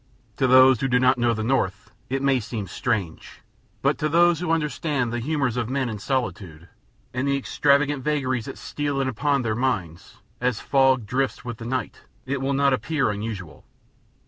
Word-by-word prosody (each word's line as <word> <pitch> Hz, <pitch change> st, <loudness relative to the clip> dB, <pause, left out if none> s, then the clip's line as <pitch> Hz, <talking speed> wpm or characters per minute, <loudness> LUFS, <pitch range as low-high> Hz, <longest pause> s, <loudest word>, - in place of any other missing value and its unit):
To 130 Hz, -, +2 dB
those 130 Hz, -1 st, +6 dB
who 135 Hz, -, +1 dB
do 125 Hz, -1 st, +3 dB
not 130 Hz, 0 st, +3 dB
know 120 Hz, -1 st, +2 dB
the 110 Hz, -, -3 dB
North 105 Hz, -4 st, -1 dB, 0.2 s
it 135 Hz, +1 st, -2 dB
may 135 Hz, -2 st, +3 dB
seem 110 Hz, -2 st, -5 dB
strange, 95 Hz, -3 st, -3 dB, 0.4 s
but -, -, +2 dB
to 150 Hz, -, 0 dB
those 170 Hz, +1 st, +4 dB
who 180 Hz, -1 st, -3 dB
understand 150 Hz, -5 st, -1 dB
the 120 Hz, -, -1 dB
humors 135 Hz, -2 st, -1 dB
of 120 Hz, -1 st, -2 dB
men 130 Hz, -1 st, -1 dB
in 110 Hz, -2 st, -5 dB
solitude, 95 Hz, -, -3 dB, 0.5 s
and 125 Hz, +3 st, -1 dB
the 140 Hz, 0 st, +2 dB
extravagant 140 Hz, 0 st, +1 dB
vagaries 130 Hz, -6 st, -1 dB
that -, -, -7 dB
steal 145 Hz, -1 st, -3 dB
in 135 Hz, -, 0 dB
upon 140 Hz, +2 st, 0 dB
their 110 Hz, -2 st, 0 dB
minds, 95 Hz, -9 st, -3 dB, 0.2 s
as 125 Hz, -3 st, 0 dB
fog 135 Hz, -4 st, +2 dB
drifts 130 Hz, +4 st, -2 dB
with 120 Hz, -1 st, -6 dB
the 115 Hz, -, -7 dB
night, 130 Hz, +2 st, -3 dB, 0.2 s
it 135 Hz, +1 st, -2 dB
will 135 Hz, +1 st, 0 dB
not 140 Hz, 0 st, +3 dB
appear 140 Hz, -3 st, 0 dB
unusual. 100 Hz, -4 st, -6 dB
130 Hz, 185 wpm, -24 LUFS, 115-140 Hz, 0.5 s, those